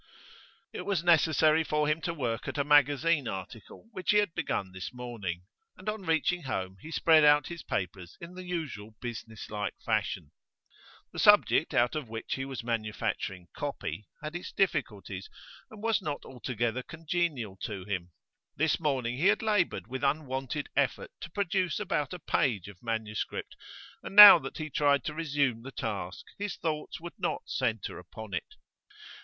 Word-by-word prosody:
It - - -4
was 195 -5 -1
necessary 160 -1 +4
for 150 -1 0
him 155 +2 +1
to 170 0 -2
work 120 -5 -2
at - - -4
a 140 - +2
magazine 145 0 +4
article 95 - -8
which 185 -4 -6
he 210 - +6
had 205 -5 +2
begun 95 - -2
this 95 0 -6
morning, 115 -9 -5 0.3
and 185 - -13
on 215 0 -2
reaching 165 +2 +2
home 95 - -4
he 155 - -9
spread 160 -1 +5
out 145 -1 +5
his 170 -2 -6
papers 90 -2 -4
in 170 +1 -9
the 185 - -8
usual 145 - -5
businesslike 110 -3 -5
fashion. 75 - -1 0.8
The - - -5
subject - - +5
out 120 +4 +3
of 150 -7 -4
which 110 0 -4
he 135 - -3
was 135 -3 -6
manufacturing 110 -5 -3
'copy' 95 +6 -4 0.2
had 155 +2 -5
its 175 - -5
difficulties, 100 - -1 0.4
and 215 -1 -12
was 225 -2 +2
not 150 -5 -4
altogether 125 -1 -2
congenial 160 - -2
to 100 -1 -5
him; 90 -3 -3 0.5
this 160 +3 +1
morning 130 -6 -1
he 165 +7 +3
had 205 +2 +3
laboured 210 -5 +1
with 130 +1 -6
unwonted 135 -1 -1
effort 140 -3 0
to 170 - -7
produce 185 -1 0
about 180 -9 -1
a 180 - -4
page 120 - 0
of 100 -3 -12
manuscript, 110 -2 -3 0.5
and - - -8
now 205 -4 +13
that 135 -2 -7
he 155 -1 -5
tried 140 -3 +3
to 155 - -3
resume 140 -7 0
the 135 +3 -8
task 100 -8 -4
his 205 -1 -3
thoughts 155 -2 -3
would 170 +1 -9
not - - -1
centre 115 -6 -2
upon 100 +4 -10
it. 90 - -4
140 Hz, 165 wpm, -30 LUFS, 110-165 Hz, 0.8 s, now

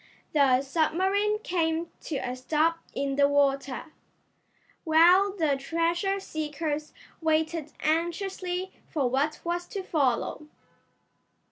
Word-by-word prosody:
The 270 -3 +4
submarine 375 +8 +1
came 330 -1 0 0.2
to 310 - -3
a 255 -2 -3
stop 310 +6 +1 0.2
in 275 0 -1
the 280 0 +5
water, 280 0 0 0.9
while 350 +5 +5
the 320 -7 +1
treasure 335 +7 0
seekers 305 -3 -4 0.3
waited 315 -1 0
anxiously 360 +3 -1 0.2
for 285 -6 0
what 280 +5 0
was 350 +1 -2
to 395 -2 -5
follow. 295 -2 0
320 Hz, 105 wpm, -27 LUFS, 285-345 Hz, 0.9 s, the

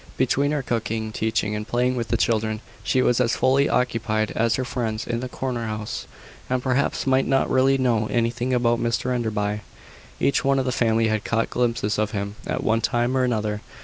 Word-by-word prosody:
Between 135 +2 +2
her 145 -2 -1
cooking, 110 -2 -2
teaching, 110 -1 -1
and 105 +1 -4
playing 125 +2 +1
with 120 -2 -2
the - - +1
children, 110 -1 0 0.2
she 130 - +2
was 125 +1 +3
as 115 -2 +2
fully 135 +2 +3
occupied 110 -3 0
as 115 0 +1
her 130 - -2
friends 115 -3 -3
in 120 -1 -2
the 130 +1 -5
corner 125 -3 -3
house, 110 +1 -5 0.4
and 125 0 0
perhaps 130 +1 0
might 135 0 +2
not 135 0 +2
really 135 +1 +4
know 120 -5 +1
anything 120 +2 0
about 120 -1 +2
Mr 120 +2 0
Enderby. 105 -3 -1 0.6
Each 140 - +2
one 135 0 +3
of 135 - 0
the 130 - 0
family 115 -2 +2
had 110 -1 0
caught 115 0 0
glimpses 115 -4 0
of 110 0 0
him 100 0 -3
at - - -2
one 115 +1 +2
time 120 +2 +1
or 130 - +2
another. 105 -4 -1
120 Hz, 200 wpm, -23 LUFS, 110-130 Hz, 0.6 s, really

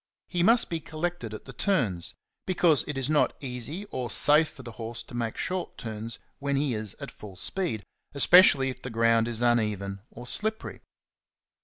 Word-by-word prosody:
He 175 -2 -1
must 230 +6 +5
be 165 - -3
collected 155 -6 -4
at 110 - -8
the 135 - -10
turns, 120 - 0 0.3
because 175 -7 +4
it 150 - -4
is 135 -1 0
not 150 0 +2
easy 135 - -5
or 125 -2 -3
safe 150 +9 +4
for 130 - -13
the 120 - -8
horse 115 +1 -5
to - - -15
make 115 -2 -3
short 185 0 -3
turns 110 -1 -5 0.2
when 140 0 -1
he 140 -2 +1
is 110 -2 -3
at - - -7
full 100 -3 -11
speed, 110 - -1 0.3
especially 140 -3 +6
if 125 - -12
the 125 - -6
ground 115 0 +3
is 120 0 -1
uneven 105 -5 0
or 120 - -11
slippery. 220 - -1
125 Hz, 180 wpm, -27 LUFS, 115-160 Hz, 0.3 s, especially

